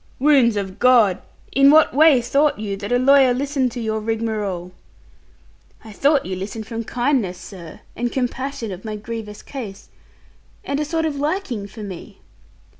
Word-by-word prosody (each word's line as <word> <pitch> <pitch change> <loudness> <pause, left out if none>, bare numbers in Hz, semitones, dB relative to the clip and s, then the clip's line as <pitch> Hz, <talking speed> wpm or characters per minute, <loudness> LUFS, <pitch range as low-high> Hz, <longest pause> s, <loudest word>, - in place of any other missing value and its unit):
'Wounds 265 -5 +4
of 195 -1 -4
God! 235 -7 +4 0.3
In 275 +1 +5
what 310 +2 +5
way 295 -2 +6
thought 280 +5 +2
you 205 -2 -4
that 200 +2 -6
a 245 - +4
lawyer 265 -1 +5
listened 270 -1 -1
to 245 - -5
your 220 -1 -2
rigmarole?' 215 -5 -3 1.1
'I 220 - -10
thought 280 +7 +2
that - - -9
you 185 - -2
listened 205 +4 -6
from 230 +1 -5
kindness, 240 -6 -1
sir, 175 -4 -11
and 240 0 -2
compassion 260 -2 -3
of 185 0 -8
my 215 -2 -5
grievous 210 -1 -7
case, 215 -8 -8 0.7
and 280 +1 -2
a 300 - -1
sort 325 +1 -1
of 300 -3 -2
liking 290 - -2
for 215 +1 -10
me.' 190 -4 -9
235 Hz, 170 wpm, -21 LUFS, 210-275 Hz, 1.1 s, way